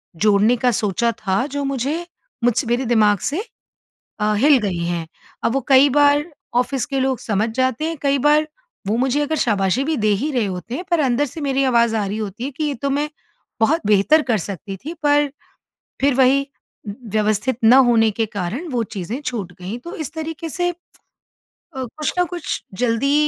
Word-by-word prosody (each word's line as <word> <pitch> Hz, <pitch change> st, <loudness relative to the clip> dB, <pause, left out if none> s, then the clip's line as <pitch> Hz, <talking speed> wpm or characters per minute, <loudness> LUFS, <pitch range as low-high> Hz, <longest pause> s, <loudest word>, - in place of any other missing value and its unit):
जोड़ने 210 Hz, +5 st, +3 dB
का 250 Hz, +1 st, +2 dB
सोचा 225 Hz, +2 st, 0 dB
था, 200 Hz, +1 st, -1 dB
जो 285 Hz, 0 st, -3 dB
मुझे 275 Hz, +5 st, -2 dB, 0.4 s
मुझसे 240 Hz, +1 st, +2 dB
मेरे 240 Hz, +3 st, 0 dB
दिमाग़ 215 Hz, -4 st, +3 dB
से 325 Hz, +9 st, -2 dB, 0.8 s
अ, 210 Hz, 0 st, +2 dB
हिल 280 Hz, +6 st, +5 dB
गई 195 Hz, -6 st, -2 dB
हैं। 170 Hz, -1 st, -3 dB, 0.4 s
अब 230 Hz, -, +1 dB
वो 270 Hz, -, +2 dB
कई 270 Hz, +1 st, +6 dB
बार 290 Hz, +1 st, +4 dB, 0.4 s
ऑफ़िस 255 Hz, +1 st, -1 dB
के 275 Hz, -2 st, -2 dB
लोग 265 Hz, -1 st, 0 dB
समझ 215 Hz, +1 st, -1 dB
जाते 260 Hz, +2 st, 0 dB
हैं, 325 Hz, 0 st, -3 dB
कई 280 Hz, -1 st, +2 dB
बार 300 Hz, +3 st, +3 dB, 0.4 s
वो 215 Hz, -, +1 dB
मुझे 265 Hz, +3 st, +1 dB
अगर 295 Hz, +2 st, -1 dB
शाबाशी 205 Hz, +1 st, +1 dB
भी 315 Hz, +2 st, 0 dB
दे 215 Hz, -, +1 dB
ही 300 Hz, +2 st, -1 dB
रहे 245 Hz, -5 st, +1 dB
होते 190 Hz, +5 st, -5 dB
हैं, 350 Hz, -, -4 dB
पर 340 Hz, -, +3 dB
अंदर 270 Hz, 0 st, +2 dB
से 300 Hz, +4 st, -8 dB
मेरी 275 Hz, -1 st, +1 dB
आवाज़ 235 Hz, -3 st, +3 dB
आ 210 Hz, -2 st, 0 dB
रही 200 Hz, +2 st, -3 dB
होती 215 Hz, +1 st, -5 dB
है, 275 Hz, -, -3 dB
कि 295 Hz, +4 st, -4 dB
ये 295 Hz, -1 st, 0 dB
तो 275 Hz, +4 st, -3 dB
मैं 290 Hz, +2 st, 0 dB, 0.5 s
बहुत 280 Hz, +9 st, +2 dB
बेहतर 215 Hz, +10 st, +4 dB
कर 220 Hz, -, +3 dB
सकती 195 Hz, +1 st, -6 dB
थी, 300 Hz, -, -7 dB
पर 290 Hz, -1 st, +3 dB, 0.7 s
फिर 280 Hz, 0 st, +3 dB
वही 270 Hz, +1 st, +3 dB, 0.4 s
व्यवस्थित 215 Hz, +2 st, -1 dB
न 225 Hz, -, +8 dB, 0.2 s
होने 225 Hz, -2 st, +4 dB
के 225 Hz, +2 st, -1 dB
कारण 210 Hz, -, -4 dB
वो 240 Hz, -2 st, 0 dB
चीज़ें 200 Hz, +7 st, -4 dB
छूट 230 Hz, -10 st, -4 dB
गईं। 190 Hz, +6 st, -5 dB
तो 340 Hz, +8 st, -8 dB
इस 310 Hz, -1 st, -6 dB
तरीक़े 320 Hz, 0 st, -5 dB
से 355 Hz, +3 st, -1 dB
अ, -, -, -13 dB, 1.0 s
कुछ 265 Hz, +4 st, -3 dB
ना 360 Hz, -, +4 dB
कुछ 345 Hz, -4 st, -4 dB, 0.2 s
जल्दी 245 Hz, +4 st, +2 dB
255 Hz, 195 wpm, -20 LUFS, 215-290 Hz, 1.0 s, न